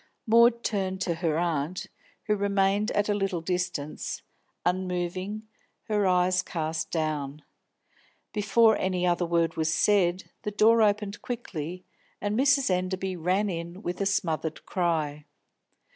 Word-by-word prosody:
Maud 235 +1 +5
turned 190 -3 -1
to 180 -2 0
her 165 -2 -1
aunt, 170 0 -1 0.4
who 210 - +1
remained 200 +1 +1
at 205 0 +1
a 210 - +2
little 195 -3 -1
distance, 180 -3 -3 0.4
unmoving, 185 +3 -2 0.4
her 210 -2 +1
eyes 180 0 +3
cast 160 -2 -3
down. 150 -3 -2 0.9
Before 220 +1 +4
any 185 -1 0
other 175 0 +1
word 165 -1 +1
was 160 0 +1
said, 185 0 +2
the - - -3
door 220 +2 +4
opened 210 -1 +1
quickly, 180 -7 -5 0.3
and 205 0 -1
Mrs. 275 -2 +3
Enderby 185 +1 -1
ran 185 +5 +1
in 170 +2 -5
with 175 +2 -3
a 200 - +2
smothered 160 -4 -1
cry. 155 -5 -1
185 Hz, 130 wpm, -27 LUFS, 170-205 Hz, 0.9 s, Maud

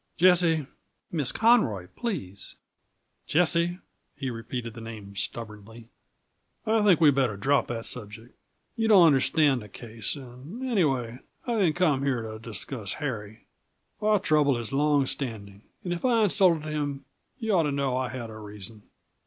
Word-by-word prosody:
"Jessie 170 -3 +4 0.2
" - - -49
"Miss 150 -7 0
Conroy, 215 - +3
please." 150 - -4 0.7
"Jessie" 170 +1 +2 0.4
he 135 -2 -4
repeated 115 0 -5
the 115 - -9
name 105 -3 -9
stubbornly 110 +2 -6 0.8
"I 220 0 +3
think 200 -6 +5
we'd 150 -3 +6
better 130 -6 +1
drop 135 +5 +2
that 115 -1 -4
subject. 110 0 -6 0.4
You 225 -1 0
don't 195 -5 +8
understand 140 -2 +3
the 105 - -11
case; 115 +3 -5
and, 140 - -8
anyway, 135 - 0 0.3
I 240 - -1
didn't 175 -7 +2
come 155 -7 +2
here 130 -4 0
to 110 0 -7
discuss 115 -1 -5
Harry. 110 -8 -5 0.6
Our 210 -1 +3
trouble 145 -6 +3
is 115 -1 -5
long 145 0 +3
standing, 105 -8 -5 0.2
and 175 - -2
if 170 - -6
I 235 -3 +3
insulted 180 -6 +3
him 145 -2 -3 0.3
you 225 -4 -1
ought 180 - +5
to - - -1
know 140 -2 0
I 130 -1 -1
had 120 -3 -6
a 110 - -9
reason. 105 0 -9
135 Hz, 155 wpm, -27 LUFS, 115-170 Hz, 0.8 s, don't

